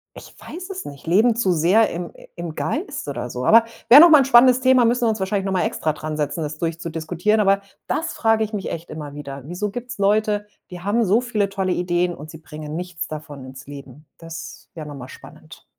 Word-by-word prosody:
ich -, -, -12 dB
weiß 365 Hz, +3 st, -9 dB
es 375 Hz, -1 st, -6 dB
nicht, 140 Hz, +2 st, -11 dB
leben 220 Hz, +7 st, +4 dB
zu 190 Hz, -6 st, +2 dB
sehr 180 Hz, +8 st, +3 dB
im 170 Hz, 0 st, -6 dB, 0.2 s
im 170 Hz, -2 st, -6 dB
Geist 290 Hz, -, -4 dB
oder 140 Hz, -3 st, -4 dB
so. 125 Hz, +1 st, -5 dB
Aber 230 Hz, +1 st, +7 dB, 0.2 s
wäre 275 Hz, +5 st, +10 dB
noch 340 Hz, -, +9 dB
mal 305 Hz, -2 st, +8 dB
'n -, -, +1 dB
spannendes 250 Hz, 0 st, +6 dB
Thema, 260 Hz, -1 st, +4 dB
müssen 240 Hz, +1 st, +2 dB
wir -, -, +3 dB
uns 220 Hz, -1 st, -2 dB
wahrscheinlich 195 Hz, 0 st, -1 dB
noch 195 Hz, -, -1 dB
mal 180 Hz, -2 st, +1 dB
extra 155 Hz, -, -1 dB
dran 155 Hz, 0 st, -6 dB
setzen, 150 Hz, +2 st, -2 dB
das 150 Hz, 0 st, -5 dB
durchzudiskutieren, 165 Hz, +5 st, -1 dB
aber 195 Hz, -1 st, +3 dB, 0.3 s
das 325 Hz, +3 st, -2 dB
frage 225 Hz, -1 st, +2 dB
ich 215 Hz, -, -4 dB
mich 205 Hz, -4 st, -4 dB
echt 165 Hz, +1 st, -7 dB
immer 150 Hz, -2 st, -7 dB
wieder. 140 Hz, -2 st, -8 dB
Wieso 180 Hz, +6 st, -3 dB
gibt's 245 Hz, +4 st, -7 dB
Leute, 210 Hz, +1 st, +1 dB, 0.2 s
die 180 Hz, -1 st, -9 dB
haben 215 Hz, +5 st, +1 dB
so 210 Hz, +5 st, +3 dB
viele 220 Hz, -5 st, -1 dB
tolle 190 Hz, -2 st, -2 dB
Ideen 175 Hz, 0 st, 0 dB
und 155 Hz, -1 st, -11 dB
sie 160 Hz, -, -11 dB
bringen 150 Hz, -1 st, -8 dB
nichts 175 Hz, 0 st, -5 dB
davon 150 Hz, -3 st, -8 dB
ins 130 Hz, +1 st, -12 dB
Leben? 140 Hz, 0 st, -11 dB
Das 165 Hz, 0 st, -10 dB
wäre 160 Hz, -2 st, -8 dB
noch 145 Hz, -, -8 dB
mal 125 Hz, -2 st, -9 dB
spannend. -, -, -14 dB
180 Hz, 225 wpm, -21 LUFS, 155-220 Hz, 0.3 s, wäre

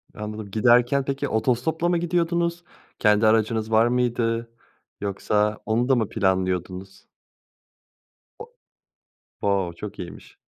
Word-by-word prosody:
Anladım. 105 Hz, -1 st, -7 dB
Giderken 120 Hz, +5 st, +3 dB
peki 135 Hz, 0 st, -2 dB
otostopla 125 Hz, +9 st, 0 dB
mı 175 Hz, -, +2 dB
gidiyordunuz? 170 Hz, 0 st, 0 dB, 0.4 s
Kendi 105 Hz, 0 st, +4 dB
aracınız 110 Hz, 0 st, +1 dB
var 110 Hz, +2 st, +5 dB
mıydı, 120 Hz, -2 st, 0 dB, 0.5 s
yoksa 105 Hz, +1 st, 0 dB
onu 120 Hz, +4 st, 0 dB
da 135 Hz, -, +5 dB
mı 110 Hz, -4 st, 0 dB
planlıyordunuz? 95 Hz, -1 st, -2 dB, 1.3 s
O 455 Hz, -, -8 dB, 0.9 s
o! 95 Hz, -4 st, 0 dB
Çok 105 Hz, +4 st, -8 dB
iyiymiş 90 Hz, -, -10 dB
110 Hz, 110 wpm, -24 LUFS, 105-125 Hz, 1.3 s, var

